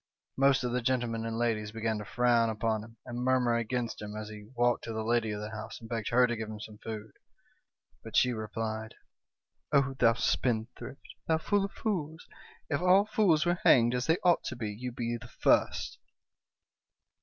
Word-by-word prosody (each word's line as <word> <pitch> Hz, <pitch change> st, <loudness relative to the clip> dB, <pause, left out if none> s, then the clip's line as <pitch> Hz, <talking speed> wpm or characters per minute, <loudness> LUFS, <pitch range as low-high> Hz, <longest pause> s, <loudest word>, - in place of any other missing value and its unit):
" -, -, -63 dB
Most 135 Hz, -1 st, +3 dB
of 125 Hz, -, -1 dB
the 125 Hz, +1 st, 0 dB
gentlemen 120 Hz, -2 st, -1 dB
and 115 Hz, 0 st, -3 dB
ladies 110 Hz, -3 st, 0 dB
began 110 Hz, -1 st, -2 dB
to 105 Hz, -, -6 dB
frown 120 Hz, 0 st, +2 dB
upon 110 Hz, 0 st, -1 dB
him, 115 Hz, +1 st, -14 dB
and 120 Hz, -1 st, -5 dB
murmur 125 Hz, -2 st, +2 dB
against 115 Hz, 0 st, -2 dB
him, 105 Hz, 0 st, -6 dB
as 110 Hz, 0 st, -6 dB
he 105 Hz, 0 st, -10 dB
walked 120 Hz, 0 st, +2 dB
to 115 Hz, -, -4 dB
the 110 Hz, 0 st, -2 dB
lady 115 Hz, 0 st, +1 dB
of 105 Hz, -1 st, -3 dB
the 105 Hz, +1 st, -6 dB
house 110 Hz, +1 st, -7 dB
and 115 Hz, -, -11 dB
begged 115 Hz, -2 st, -3 dB
her 125 Hz, +1 st, +5 dB
to 120 Hz, -1 st, -1 dB
give 110 Hz, -1 st, -5 dB
him 110 Hz, -1 st, -7 dB
some 105 Hz, 0 st, -10 dB
food, 110 Hz, -1 st, -7 dB, 0.9 s
but 110 Hz, -, -8 dB
she 125 Hz, -1 st, +4 dB
replied: 110 Hz, 0 st, -4 dB, 0.3 s
" -, -, -62 dB
' -, -, -53 dB
Oh, 140 Hz, -2 st, +3 dB
thou 115 Hz, -, +5 dB
spendthrift! 120 Hz, +3 st, -2 dB, 0.2 s
thou 160 Hz, -, +3 dB
fool 200 Hz, +4 st, +1 dB
of 200 Hz, -, -8 dB
fools! 160 Hz, -8 st, -3 dB, 0.4 s
if 145 Hz, +1 st, -1 dB
all 185 Hz, +3 st, +5 dB
fools 195 Hz, -7 st, +3 dB
were 175 Hz, 0 st, +1 dB
hanged, 120 Hz, -1 st, +6 dB
as 125 Hz, 0 st, -1 dB
they 165 Hz, +1 st, +4 dB
ought 175 Hz, -2 st, +4 dB
to -, -, -4 dB
be, 110 Hz, -3 st, -4 dB
you 125 Hz, +4 st, -5 dB
'd -, -, -17 dB
be 120 Hz, -1 st, -2 dB
the 115 Hz, 0 st, -11 dB
first.' -, -, +1 dB
115 Hz, 210 wpm, -30 LUFS, 110-130 Hz, 0.9 s, hanged